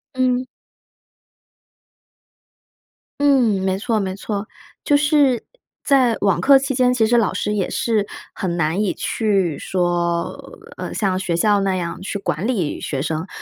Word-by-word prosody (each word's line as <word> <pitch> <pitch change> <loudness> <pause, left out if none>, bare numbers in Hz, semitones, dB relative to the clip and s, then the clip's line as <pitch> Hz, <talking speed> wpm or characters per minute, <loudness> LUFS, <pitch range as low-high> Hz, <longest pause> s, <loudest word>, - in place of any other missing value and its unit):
嗯。 255 0 +1 2.8
嗯， 245 -9 +3
没 190 0 0
错 220 +2 0
没 190 -2 -3
错， 205 +1 -4 0.4
就 290 - +4
是 290 -5 +3 0.4
在 260 -5 +3
网 195 -3 +2
课 275 0 +7
期 270 0 -2
间， 250 -1 +3
其 240 -3 +2
实 240 +2 +3
老 225 -5 +2
师 210 - -1
也 195 -3 -1
是 215 -3 0 0.3
很 175 -2 -3
难 165 +5 0
以 205 - 0
去 195 -8 0
说， 175 -2 -1 0.4
呃， - - -5
像 190 -3 0
学 185 -3 -1
校 205 +4 +3
那 195 -1 0
样 175 -1 -4
去 200 +1 -4
管 195 0 -2
理 190 -12 -1
学 140 - -3
生， 160 +4 -3
205 Hz, 155 characters per minute, -20 LUFS, 185-245 Hz, 2.8 s, 课